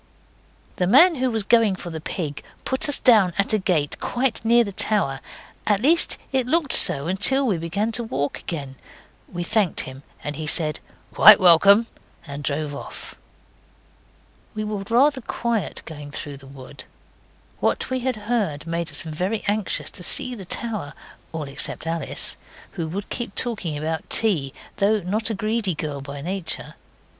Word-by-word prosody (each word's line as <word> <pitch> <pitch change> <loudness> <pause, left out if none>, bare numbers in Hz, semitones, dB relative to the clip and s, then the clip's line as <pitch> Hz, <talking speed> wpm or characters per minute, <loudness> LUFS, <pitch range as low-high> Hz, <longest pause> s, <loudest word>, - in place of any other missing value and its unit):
The 180 - 0
man 325 - +6
who 260 -3 -1
was 220 -3 -1
going 225 -2 +3
for 175 -2 -8
the 160 -1 -6
pig 155 -3 -5 0.2
put 260 +2 +2
us 290 - +6
down 205 -8 +4
at 200 +2 +3
a 215 - +2
gate 175 -7 -1
quite 245 -2 -1
near 235 +1 +4
the 200 - -6
tower 190 -9 +1 0.5
at 205 -2 +2
least 320 +9 +4
it 260 -2 0
looked 320 0 +1
so 140 0 +6
until 215 +10 +2
we 200 -9 0
began 200 +7 -2
to 235 +1 -1
walk 145 -10 -3
again. 140 -5 -6 0.5
We 175 -1 -4
thanked 205 0 0
him, 130 +1 -9 0.2
and 150 -1 -5
he 155 -1 -5
said 155 -1 +2 0.3
'Quite 210 -1 +8
welcome,' 195 +5 +6 0.4
and 145 -1 -8
drove 145 +1 -2
off. - - -9 1.4
We 215 - -3
were 210 -2 -4
rather 265 +3 +3
quiet 230 -4 -3
going 150 -2 -9
through 145 -1 -7
the 135 0 -15
wood. 135 +1 -12 0.7
What - - -1
we 260 - 0
had 255 0 -2
heard 210 -9 -2
made 170 0 -3
us 145 - -4
very 180 +7 -3
anxious 205 -1 -1
to - - -4
see 255 +7 0
the 200 -6 -8
tower 205 -7 -2 0.4
all 160 -1 -4
except 140 +3 -3
Alice, 165 -2 -3 0.3
who 165 - -4
would 195 +5 -6
keep 235 -5 -5
talking 200 -11 -1
about 160 +2 -4
tea, 170 -12 +1 0.3
though 205 +1 +2
not 210 +6 -1
a 220 - -2
greedy 215 -3 -1
girl 150 -2 -5
by 140 +1 -8
nature. 185 +2 -3
195 Hz, 170 wpm, -22 LUFS, 155-225 Hz, 1.4 s, Quite